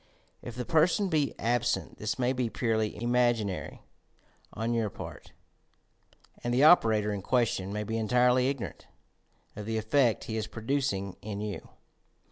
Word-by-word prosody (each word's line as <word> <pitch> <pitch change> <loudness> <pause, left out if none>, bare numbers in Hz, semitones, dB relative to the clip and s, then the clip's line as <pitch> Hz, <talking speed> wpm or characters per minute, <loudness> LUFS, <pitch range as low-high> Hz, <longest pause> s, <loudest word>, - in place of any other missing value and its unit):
If 120 - -8
the 125 0 -4
per 160 0 +4
son 200 +1 0
be 150 -4 0
absent, 120 +1 -1
this 110 0 -2
may 125 0 +1
be 125 -3 -1
purely 110 -2 -1
imaginary 120 -4 0 0.7
on 115 +2 -2
your 115 -2 0
part, - - -9 1.1
and 120 - -1
the 125 +4 +3
operator 110 -10 +5
in 100 - -4
question 110 -4 0
may 105 +1 -2
be 110 +2 -3
entirely 125 +4 +3
ignor 140 -3 -4
ant - - -20 0.7
of 105 0 -7
the 110 0 -1
effect 115 +2 +2
he 110 - -4
is 110 -1 -2
producing 110 -4 -2
in 105 -1 -5
you 105 -1 -5
115 Hz, 155 wpm, -29 LUFS, 105-125 Hz, 1.1 s, operator